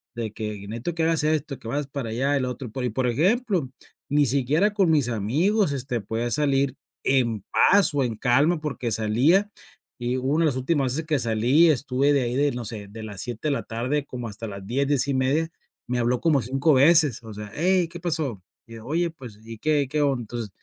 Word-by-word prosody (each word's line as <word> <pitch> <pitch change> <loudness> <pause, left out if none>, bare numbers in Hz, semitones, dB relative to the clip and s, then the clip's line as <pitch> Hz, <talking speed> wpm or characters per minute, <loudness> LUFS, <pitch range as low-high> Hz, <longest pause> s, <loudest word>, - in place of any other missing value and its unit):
de 115 -3 -4
que 105 -2 -6
"necesito 120 +10 -4
que 165 - 0
hagas 165 -2 +1
esto, 150 -3 -1
que 115 - -10
vayas 145 +1 -2
para 135 -5 -5
allá, 135 +5 0
el 130 - -1
otro", 125 0 -5
y - - -17
po 130 - -5
por 130 0 0
ejemplo, 180 - +1 0.4
ni 145 0 +3
siquiera 145 - +2
con 195 -5 +2
mis 140 -6 +2
amigos, 150 - +1
este, 125 -4 -3
podía 115 +4 -3
salir 140 -2 +1 0.3
en 115 -6 +1
paz 200 -5 +4
o 140 -2 +1
en 115 -3 -2
calma 145 +8 +2
porque 135 -6 -3
salía, 130 - +2 0.5
y 120 +1 -1
una 140 +6 +1
de - - +4
las 130 -3 -1
últimas 130 -2 0
veces 160 +2 -3
que 150 -4 +1
salí, 120 +9 +3
estuve 140 0 +1
de 140 - +2
ahí 120 +1 -2
de, 145 +1 +2
no 120 -2 -5
sé, 105 -2 -5
de 110 +1 -9
las 105 -3 -4
7 120 +4 -4
de - - +1
la - - -3
tarde 130 +5 -2
como 125 -3 -6
hasta 110 +2 -7
las 100 -1 -8
10, 135 +3 0
10:30 140 +3 +1 0.4
me 125 0 -1
habló 120 +1 +1
como 155 -6 +3
5 135 +6 +1
veces, 145 -3 +5
o 110 -1 -9
sea: 105 0 -8
"Hey, 180 +1 +2
¿qué 175 - -9
pasó?", 155 - -2 0.3
y 115 - -12
ella: 110 - -10
"Oye, 170 +4 0
pues, 125 -9 -12
y 115 -1 -10
qué 150 -3 +1
qué 150 +1 0
onda, 135 -4 +1
entonces, 115 -1 -6
135 Hz, 220 wpm, -24 LUFS, 115-150 Hz, 0.5 s, veces